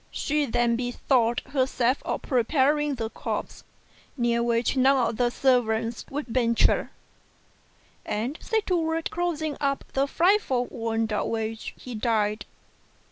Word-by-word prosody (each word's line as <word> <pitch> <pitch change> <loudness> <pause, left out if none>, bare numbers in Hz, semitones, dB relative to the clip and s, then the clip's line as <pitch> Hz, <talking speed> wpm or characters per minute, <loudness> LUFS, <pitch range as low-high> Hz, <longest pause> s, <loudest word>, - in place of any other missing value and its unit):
She 295 -1 -1
then 240 0 +2
bethought 245 -1 +1
herself 260 -1 0
of - - -3
preparing 285 +3 +2
the 225 -2 -4
corpse, - - -5 0.5
near 235 -1 +1
which 235 +2 +1
none 260 -2 +4
of 220 - -5
the 245 -1 +2
servants 235 -3 +1
would 290 +2 -4
venture; 235 -1 +2 1.1
and 230 +7 -2
set 445 -2 0
to 365 - +1
work 320 0 -1
to - - -2
close 345 -3 -2 0.2
up 275 -1 0
the 270 +1 +1
frightful 330 -7 +2
wound 225 -1 -2
of 210 - 0
which 225 0 -4
he 250 - -9
died. 215 -2 0
245 Hz, 135 wpm, -26 LUFS, 230-280 Hz, 1.1 s, none